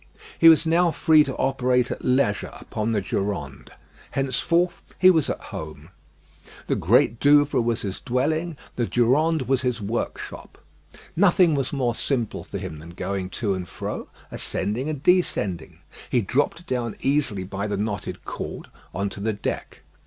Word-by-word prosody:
He 165 - +9
was 160 0 +5
now 170 +2 +3
free 155 0 +5
to 135 - -4
operate 125 -2 +1
at - - -5
leisure 125 -5 +1
upon 110 +1 -3
the 105 -3 +1
Durande. 95 -9 -3 0.4
Henceforth 170 +7 0 0.2
he 185 0 +7
was 160 -5 +2
at - - -2
home. 80 -4 -7 0.8
The - - 0
Great 115 +1 +3
Douvre 145 -2 +4
was 115 -1 -1
his 100 -2 -4
dwelling; 155 +6 -1 0.2
the 120 -2 0
Durande 145 +6 +2
was 130 0 +1
his 125 -2 -1
workshop. 110 +3 -5 0.6
Nothing 180 -2 +5
was 135 -3 -1
more 125 -4 0
simple 120 -2 -2
for - - -6
him 80 - -6
than 80 +2 -11
going 95 0 -3 0.2
to 100 - +2
and 90 -1 -4
fro, 95 - -5 0.2
ascending 110 +9 -2
and 150 -2 -5
descending. 105 - +1 0.3
He 120 - +2
dropped 145 - -1
down 120 -7 -2
easily 135 -9 +1
by 100 +2 -4
the 100 -1 -2
knotted 105 0 -4
cord - - -6 0.3
on 100 +2 0
to 100 - -9
the 110 +2 -1
deck. 105 - -5
125 Hz, 160 wpm, -24 LUFS, 100-150 Hz, 0.8 s, He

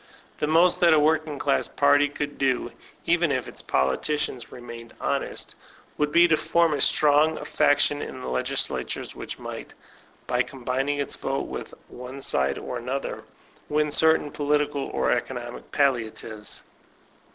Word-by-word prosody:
The 150 - 0
most 170 +3 +4
that 170 -2 +6
a - - +5
working 155 0 +1
class 140 0 +1
party 145 0 +3
could 145 0 -5
do, 130 -3 0 0.3
even 170 -2 +2
if 130 -2 -1
its - - -7
politicians 125 - -1
remained 120 -1 -10
honest, - - -3 0.4
would 150 0 0
be 170 +3 +6
to 160 - +4
form 170 0 +2
a 145 - -1
strong 150 +2 +4
faction 145 -1 +2
in 130 - -6
the 125 - -7
l^slatures, 130 +1 -2
which - - -7
might, - - -8 0.5
by 125 -1 +1
com 125 0 -7
bining 135 +3 0
its 140 - -2
vote 135 +1 -2
with - - -7
one 125 +2 -9
side 70 - +1
or 125 -1 -5
the 125 +2 -6
other, 135 0 -4 0.4
win 150 0 +1
certain 160 -1 +3
political 145 -1 0
or - - 0
economic 120 -2 -4
palliatives. 115 -5 -1
145 Hz, 150 wpm, -25 LUFS, 125-150 Hz, 0.5 s, that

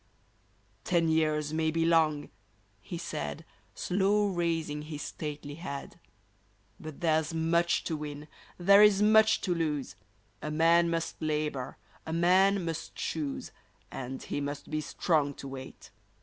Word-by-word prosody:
Ten 170 -2 +2
years 155 -1 +1
may 160 0 +1
be 165 +1 +1
long," 160 -3 +2 0.5
he 170 - -7
said, 75 - -5 0.3
Slow 200 +2 +1
raising 165 -4 -1
his 150 -1 -6
stately 150 -1 -6
head, 145 -3 -7 0.4
*' - - -38
But 155 +1 -9
there's 160 -1 +1
much 170 +1 +2
to 160 - -2
win, 150 0 -6 0.3
there 200 +3 +6
is 210 -1 +6
much 220 0 +5
to 185 - 0
lose; 150 -8 -2 0.5
A 150 - -4
man 165 +2 +4
must 165 0 -3
labor, 150 -4 -2 0.3
a 160 - -5
man 185 +3 +4
must 165 -1 -5
choose. 150 -4 -4 0.4
And 130 0 -6
he 145 - -3
must 145 +1 -5
be 155 0 -1
strong 145 -1 0
to 140 - -8
wait 135 -1 -9
160 Hz, 140 wpm, -30 LUFS, 150-170 Hz, 0.5 s, there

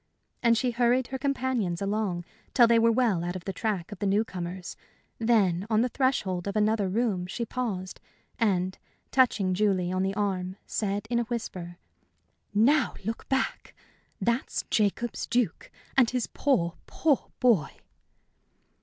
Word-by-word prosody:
And 235 -1 +4
she 250 +2 +1
hurried 245 +1 +2
her 265 0 -4
companions 255 -10 -1
along 200 -4 -1 0.3
till 240 - +8
they 230 0 +5
were 230 0 +5
well 225 -8 +2
out 175 +1 -3
of 185 - -6
the 195 - -3
track 195 -2 -2
of 205 - -8
the 205 - 0
new 205 +3 +2
comers; 180 -2 -6 0.4
then 205 -5 +2
on 220 -1 +3
the 250 - +1
threshold 205 -9 0
of 200 - -3
another 215 -2 +2
room 200 -4 0
she 235 +5 -3
paused, 210 -7 -4 0.4
and, 190 -4 +1 0.3
touching 220 -8 +3
Julie 185 -2 +1
on 185 0 0
the 195 +1 -1
arm, 190 -3 -1
said, 205 0 -2
in 235 - +2
a - - +1
whisper: 185 -7 -5 0.7
"Now 245 +6 +3
look 225 +2 -4
back. 265 0 -1 0.4
That's 235 +2 0
Jacob's 215 +2 0
Duke, 235 -7 0 0.3
and 250 -4 +5
his 250 -2 -1
poor, 175 -12 0
poor 300 -5 +1
boy!" 220 - +4
215 Hz, 155 wpm, -28 LUFS, 185-240 Hz, 0.7 s, till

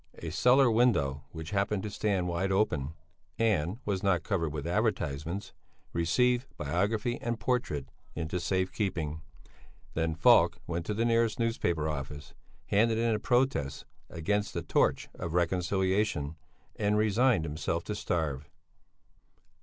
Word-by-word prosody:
A 80 - -6
cellar 125 - +5
window 70 - +2
which 80 +1 -8
happened 100 0 0
to 105 - -4
stand 95 -3 0
wide 90 +3 -1
open 80 -7 0 0.4
(and 105 -4 +1
was 100 -3 -1
not 90 -4 +2
covered 85 -7 -1
with 75 -2 -5
advertisements) 80 +8 -1 0.4
received 125 +10 +2
biography 100 +10 -1
and 120 -1 -2
portrait 110 - -1 0.3
into 85 +1 -2
safe 95 +2 0
keeping. 80 -7 -2 0.7
Then 80 0 0
Falk 80 - +5
went 85 0 -3
to 105 - -1
the 115 +2 +1
nearest 115 -2 +2
newspaper 85 -9 0
office, 75 -1 -5 0.3
handed 110 +2 +2
in 115 0 +2
a 105 - 0
protest 120 - 0 0.2
against 105 +5 -1
the - - -2
Torch - - +1
of 85 -2 -5
Reconciliation, 90 -2 +1 0.4
and 105 0 +1
resigned 110 -2 +3
himself 80 +2 -2
to 105 - -4
starve. 75 -8 -2
95 Hz, 135 wpm, -30 LUFS, 80-110 Hz, 0.7 s, cellar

